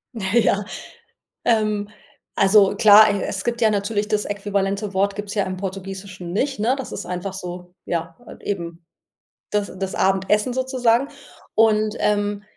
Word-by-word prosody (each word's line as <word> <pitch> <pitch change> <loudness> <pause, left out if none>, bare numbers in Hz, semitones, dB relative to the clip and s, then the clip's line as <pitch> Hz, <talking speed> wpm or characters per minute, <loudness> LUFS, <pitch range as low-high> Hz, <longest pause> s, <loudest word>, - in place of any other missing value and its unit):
Ja, 210 0 +1 0.8
ähm, 215 -3 +1 0.5
also 195 0 +5
klar, 215 +1 +8
e 200 - -2
es 190 -1 -3
gibt 240 0 -2
ja 220 - +5
natürlich 205 +1 -1
das 210 -1 0
äquivalente 200 0 -2
Wort 200 +1 +1
gibt's 205 0 -5
ja 200 -2 0
im 185 0 -4
Portugiesischen 190 -1 -6
nicht, 265 +6 -1
ne? 235 +5 +2
Das 265 - -6
ist - - -5
einfach 180 +2 -4
so, 180 -1 -8
ja, 165 -1 -3
halt - - -13
eben 170 -4 -5 0.7
das 205 -1 -1
das 190 0 -3
Abendessen 195 +5 +1
sozusagen. 260 0 +1 0.5
Und, 215 -1 +3
ähm, 205 0 0
205 Hz, 150 wpm, -22 LUFS, 190-215 Hz, 0.8 s, klar